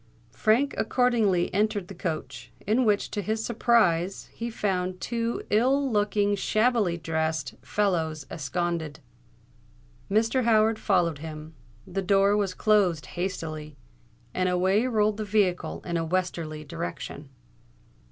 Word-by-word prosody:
Frank 230 - +2
accordingly 220 -6 +2
entered 205 -1 0
the 195 - -8
coach, 165 -3 -5
in 230 +5 +2
which, 205 -2 +1
to 205 - -2
his 220 +3 -2
surprise, 200 -6 +1
he 235 +1 -4
found 185 -4 -2
two 230 +3 -2
ill 265 +5 +3
looking, 205 -1 +1
shabbily 215 -3 +1
dressed 160 -3 -2
fellows 160 -1 -1
ensconced. 160 +1 -3 1.1
Mr. 225 +5 +2
Howard 220 -1 +3
followed 175 -7 +1
him—the 155 0 -8
door 195 +2 +3
was 200 -2 0
closed 190 -9 +2
hastily—and 150 - -5
away 190 +6 +2
rolled 215 -3 +1
the 215 - -2
vehicle 200 -3 0
in 170 -1 -1
a 165 - 0
westerly 165 -3 -2
direction. 165 -3 -6
190 Hz, 115 wpm, -26 LUFS, 160-215 Hz, 1.1 s, ill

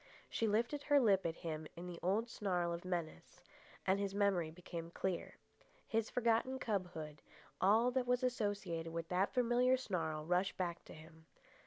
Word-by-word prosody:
She 225 - +1
lifted 235 +7 +1
her 290 -1 +4
lip 195 -7 +4
at 165 - -3
him 155 -1 -3
in 175 - -7
the 175 -1 -6
old 205 +6 +1
snarl 180 -6 -1
of 170 - -5
menace, 170 - -4 0.4
and 190 +1 +3
his 200 -1 -2
memory 195 -5 +2
became 170 0 -7
clear. 180 +1 -3 0.5
His 225 -1 0
forgotten 235 +2 +2
cubhood, 180 - -3 0.4
all 220 +6 +5
that 250 -1 0
was 250 +1 +2
associated 205 -9 -1
with 165 0 -4
that 185 +2 +2
familiar 250 +1 +3
snarl, 160 -10 -2
rushed 180 +3 +1
back 175 -2 -2
to - - -11
him. 160 +1 -15
190 Hz, 165 wpm, -37 LUFS, 170-230 Hz, 0.5 s, all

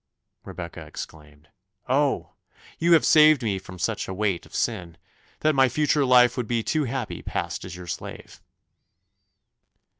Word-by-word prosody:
Rebecca - - -8
exclaimed, 75 -1 -11 0.4
"Oh! 140 +2 +1 0.5
you 170 +1 +4
have 165 - +5
saved 155 -3 +6
me 100 -4 -1
from 90 -1 -11
such - - -2
a 95 - -5
weight 100 -3 -1
of - - -13
sin, 90 -8 -2 0.4
that 155 0 +3
my 135 -2 +4
future 150 +1 +1
life 125 -1 +5
would 125 -3 -2
be 115 -1 0
too 155 +3 0
happy 125 -2 -4
passed - - -4
as - - -8
your 90 0 -9
slave." 85 - -8
120 Hz, 150 wpm, -25 LUFS, 90-145 Hz, 0.5 s, saved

